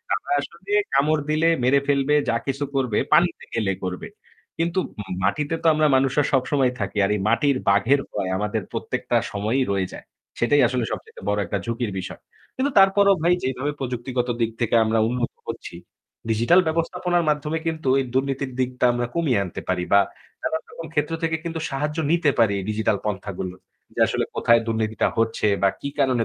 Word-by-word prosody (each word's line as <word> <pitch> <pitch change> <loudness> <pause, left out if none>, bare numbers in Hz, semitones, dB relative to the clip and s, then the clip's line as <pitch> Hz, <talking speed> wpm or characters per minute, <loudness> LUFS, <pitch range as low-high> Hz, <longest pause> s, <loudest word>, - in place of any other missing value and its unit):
আমরা - - -6
আসলে 170 +7 -8 0.2
কামড় 150 +2 +3
দিলে 155 +2 +3
মেরে 140 +3 +4
ফেলবে, 140 +1 +2
যা 115 - +2
কিছু 135 +1 -1
করবে 125 -6 +1
পানিতে 170 +2 +3
গেলে 105 -4 0
করবে। 90 -1 -4 0.5
কিন্তু 170 +3 0 0.2
ম - - -6 0.2
মাটিতে 150 +10 0
তো 165 - +3
আমরা 155 0 +3
মানুষরা 135 +2 +2
সবসময় 135 -1 +2
থাকি। 100 +1 -3
আর 95 - -1
এই - - -2
মাটির 135 +3 +2
বাঘের 105 +8 +4
ভয় 95 -3 -2
আমাদের 105 +2 -1
প্রত্যেকটা - - -1
সময়ই 110 +6 0
রয়ে 95 -2 0
যায়। - - -10 0.3
সেটাই 145 +5 +4
আসলে 125 0 -1
সবচাইতে 110 -4 -7
বড় 105 - +1
একটা 100 - -2
ঝুঁকির 115 -1 -2
বিষয়। 90 - -7 0.3
কিন্তু 275 +2 0
তারপরেও 195 0 +5
ভাই 175 - +4
যেভাবে 130 +3 -1
প্রযুক্তিগত 125 -1 -2
দিক 115 0 +1
থেকে 120 - +1
আমরা 110 +1 +1
উন্নত 120 0 -1 0.2
হচ্ছি, - - -6 0.5
ডিজিটাল 115 +11 +4
ব্যবস্থাপনার 175 +2 0
মাধ্যমে 150 +2 0
কিন্তু 160 -4 -1
এই 135 - -1
দুর্নীতির 135 0 -1
দিকটা 125 0 0
আমরা 120 0 -1
কমিয়ে 140 -11 +2
আনতে 90 - -6
পারি 90 -1 0
বা 100 - +8 0.4
নানান 160 0 -2
রকম 165 - -8
ক্ষেত্র 150 +2 0
থেকে 160 0 +1
কিন্তু 165 -1 -4
সাহায্য 150 +3 -3
নিতে 165 -3 +3
পারি 110 -3 +4
এই 95 - -5
ডিজিটাল 110 -1 +1
পন্থাগুলো। 95 -3 -4 0.4
যে - - -4
আসলে - - -1
কোথায় 115 0 +4
দুর্নীতিটা 110 -1 0
হচ্ছে 115 -1 +1 0.2
বা 100 - +6
কী 140 - -3
কারণে 130 -4 +2
130 Hz, 180 wpm, -23 LUFS, 110-155 Hz, 0.5 s, বা